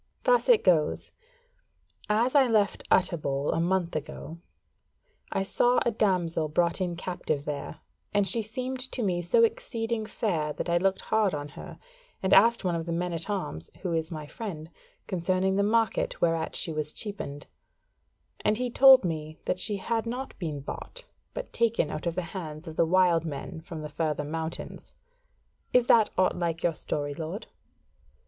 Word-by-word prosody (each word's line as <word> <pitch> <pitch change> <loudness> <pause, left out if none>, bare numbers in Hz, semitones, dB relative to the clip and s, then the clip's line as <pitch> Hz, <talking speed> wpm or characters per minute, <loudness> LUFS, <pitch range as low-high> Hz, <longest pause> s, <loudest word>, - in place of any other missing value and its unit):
Thus - - +3
it 470 -3 +6
goes: 160 -4 +2 1.0
As 230 +4 +2
I 275 -3 +6
left 215 -3 +2
Utterbol 145 -6 +1
a - - 0
month 175 -1 0
ago, 155 +2 -6 0.9
I 195 - 0
saw 245 +5 +2
a 235 - +3
damsel 180 -7 +1
brought 170 +4 +1
in 175 -2 -1
captive 155 -4 -3
there, 145 -2 -5 0.3
and 205 -1 +2
she 230 +2 +3
seemed 255 +4 -4
to 245 - -1
me 180 -3 0
so 175 - +4
exceeding 235 - -1
fair 160 -10 -1
that 150 - -4
I 170 0 +3
looked 190 +1 +1
hard 215 -5 +1
on 145 0 -5
her, - - -10 0.5
and 190 - +2
asked 230 +1 +6
one 180 - +1
of 165 0 -3
the - - -2
men 175 +1 -1
at 165 +4 -3
arms 85 - -3
who 180 -3 -1
is 160 -1 -1
my 155 -3 -6
friend 165 -3 -7 0.3
concerning 185 +1 0
the 200 - +2
market 220 +1 +1
whereat 165 -1 0
she 165 - 0
was 155 0 -2
cheapened; 150 -9 -5 0.9
and 210 0 +1
he 250 0 -2
told 265 -3 +8
me 155 -2 -4
that 180 - -1
she 205 +1 0
had 225 +3 -2
not 255 +3 -4
been 155 -6 -4
bought, - - -8 0.3
but - - -6
taken 230 -9 +1
out 155 - -4
of 170 - -1
the 180 - -1
hands 160 -3 -6
of 160 - -7
the 165 - +3
wild 175 -2 +4
men 155 0 -6
from 160 -1 -8
the - - -4
further 150 0 -1
mountains. 160 +2 -6 0.8
Is 250 -1 +5
that 225 -3 +5
aught 185 - +3
like 170 -2 0
to - - -12
your 170 - +2
story, 145 -2 -3
lord?" 165 +8 -5
180 Hz, 175 wpm, -28 LUFS, 160-220 Hz, 1.0 s, told